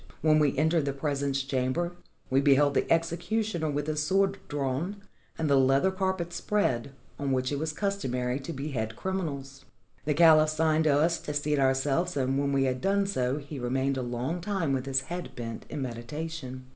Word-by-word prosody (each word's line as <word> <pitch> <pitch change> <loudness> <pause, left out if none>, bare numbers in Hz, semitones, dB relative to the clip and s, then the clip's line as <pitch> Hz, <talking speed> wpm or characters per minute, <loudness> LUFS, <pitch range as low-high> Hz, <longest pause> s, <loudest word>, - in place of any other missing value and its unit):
When 155 -1 +4
we 145 -3 +2
entered 160 +1 +2
the 140 - -1
presence 140 -1 -1
chamber, 135 +6 -1 0.4
we 135 +1 +4
beheld 145 0 +4
the - - 0
executioner 170 +2 0
with 145 0 -1
his 155 0 -1
sword 195 +5 +2
drawn 145 +6 -2 0.4
and 160 - -1
the 140 -1 +4
leather 135 +8 +3
carpet 190 -2 -2
spread, 140 - 0 0.3
on 140 -1 -1
which 130 0 0
it 140 - -1
was 160 +1 -1
customary 130 -10 -1
to 140 +4 -6
behead 130 -7 -3
criminals. 140 -8 -4 0.4
The 150 -1 +1
caliph 155 -1 +7
signed 155 0 +2
to 145 -2 +4
us 165 +2 +2
to 150 - -5
seat 145 0 +1
ourselves, 135 +6 +1
and 135 0 +1
when 140 0 0
we 135 -1 +2
had 130 -1 -1
done 200 +1 +2
so 130 -8 0
he 145 -1 -7
remained 130 +2 0
a 130 - -2
long 125 +8 -3
time 180 -6 -1
with 130 0 -2
his 135 0 +2
head 175 +5 -6
bent 115 -2 -6
in 145 - -3
meditation. 130 +2 -6
145 Hz, 185 wpm, -28 LUFS, 135-165 Hz, 0.4 s, caliph